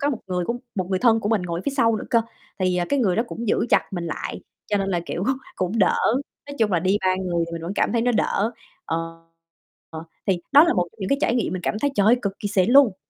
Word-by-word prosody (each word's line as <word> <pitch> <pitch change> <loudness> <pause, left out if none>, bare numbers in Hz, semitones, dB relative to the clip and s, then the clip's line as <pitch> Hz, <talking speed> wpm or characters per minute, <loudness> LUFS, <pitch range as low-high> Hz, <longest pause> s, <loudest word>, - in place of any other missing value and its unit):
có 285 - +1
một 245 - -3
người 180 -1 -1
cũng 235 +6 -2 0.2
một 185 -3 -2
người 185 - +1
thân 225 -1 +4
của 205 - -2
mình 215 -5 +1
ngồi 170 -1 -3
phía 280 - 0
sau 230 -3 +3
nữa - - -5
cơ, 230 -1 +4 0.4
thì, 185 -1 +1
à, 175 - +1
cái 280 - +1
người 195 -8 +2
đó 225 - +3
cũng 230 -2 -5
giữ 225 - +1
chặt - - +3
mình 175 -2 -3
lại, 155 - -5 0.3
cho 205 - 0
nên 195 - -1
là, 175 - 0
kiểu, 180 - -3 0.3
cũng 185 +5 -1
đỡ, 195 - +3 0.5
nói 285 0 -8
chung 215 -3 +2
là 175 - +3
đi 190 +3 +2
3 185 0 +1
người 175 -3 -1
thì 170 - -10
mình 165 -1 -5
vẫn 175 - -4
cảm - - +1
thấy 230 -1 +1
nó 245 0 +2
đỡ. 220 +1 0 0.3
Ờ, 165 - -2 0.9
ờ, 160 0 -7 0.2
thì 185 -3 +1
đó 290 +3 +9
là 340 - +2
một 180 -1 +1
trong 225 - -27
những 190 - -3
cái 275 - +2
trải 235 - +1
nghiệm 225 -8 0
mình 185 -1 -4
cảm 210 - -1
thấy, 285 - +1
trời 200 - +2
ơi, 240 - +6
cực 200 -1 -3
kỳ 205 - -2
xịn 195 +1 +2
luôn. 260 -8 +6
200 Hz, 290 wpm, -23 LUFS, 180-230 Hz, 0.9 s, đó